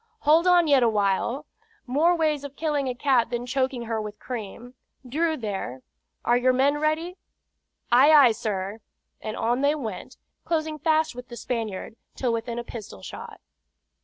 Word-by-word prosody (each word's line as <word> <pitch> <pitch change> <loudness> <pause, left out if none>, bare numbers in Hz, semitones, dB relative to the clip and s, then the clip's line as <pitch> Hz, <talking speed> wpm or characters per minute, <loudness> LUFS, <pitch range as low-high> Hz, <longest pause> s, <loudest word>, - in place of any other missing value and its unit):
"Hold 320 +4 +4
on 350 -2 +5
yet 280 -3 +5
awhile. 220 +5 +1 0.4
More 305 +7 +3
ways 305 -3 0
of 285 -1 -8
killing 290 -4 -1
a 250 - -3
cat 250 -3 +2
than 240 0 -3
choking 260 -1 -1
her 225 -1 -2
with 210 0 -7
cream. 240 0 -7 0.3
Drew, 315 +5 0
there, 195 - -5 0.4
are 240 - +4
your 255 +1 +3
men 280 +3 +2
ready?" 320 +4 -1 0.7
"Ay, 260 +5 +7
ay, 285 -6 +8
sir!" 210 -2 -3 0.4
and 215 - -5
on 240 +3 0
they 285 +2 +3
went, 225 -10 -6 0.3
closing 310 -2 -2
fast 315 0 +2
with 250 0 -9
the 240 - -9
Spaniard, 225 -3 -4 0.2
till 245 -3 0
within 230 +1 -3
a 240 - -3
pistol 215 - -9
shot. - - -9
250 Hz, 160 wpm, -25 LUFS, 230-300 Hz, 0.7 s, ay